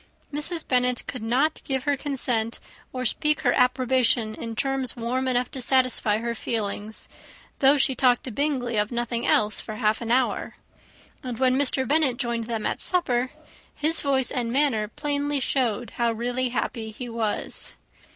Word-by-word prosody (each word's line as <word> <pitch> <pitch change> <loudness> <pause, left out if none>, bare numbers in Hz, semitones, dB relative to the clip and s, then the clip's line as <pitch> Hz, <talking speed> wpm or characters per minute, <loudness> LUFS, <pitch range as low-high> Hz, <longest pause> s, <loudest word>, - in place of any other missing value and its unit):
Mrs. 315 +3 -1
Bennet 250 -1 +2
could 250 - -6
not 255 +8 +1
give 265 -2 -2
her 285 0 +1
consent, 250 -5 -1 0.3
or 255 0 -4
speak 300 +6 +2
her 245 -5 +3
approbation 250 -3 +2
in 230 +1 -6
terms 270 0 0
warm 250 +3 -2
enough 250 -1 0
to 265 - -3
satisfy 255 -5 +2
her 235 +1 -2
feelings, 220 -2 -4 0.5
though 275 +1 +5
she 270 0 +2
talked 250 -1 +3
to 255 - -6
Bingley 255 -3 -1
of 210 +2 +1
nothing 240 0 -2
else, 215 0 +3
for 215 - -7
half 215 0 +1
an 230 - -4
hour; 250 +1 +1 0.7
and 250 -3 -5
when 255 0 +3
Mr. 265 -1 +1
Bennet 285 -4 +2
joined 235 -3 -2
them 225 -2 -3
at - - -2
supper, 255 -9 +1 0.5
his 315 +2 +4
voice 265 -3 +2
and 240 -4 -2
manner 255 -6 +1
plainly 285 +4 -2
showed 245 -4 -1
how 235 -1 0
really 245 +3 -1
happy 230 -2 -3
he 245 +3 -7
was. 230 -3 -3
250 Hz, 165 wpm, -25 LUFS, 230-270 Hz, 0.7 s, though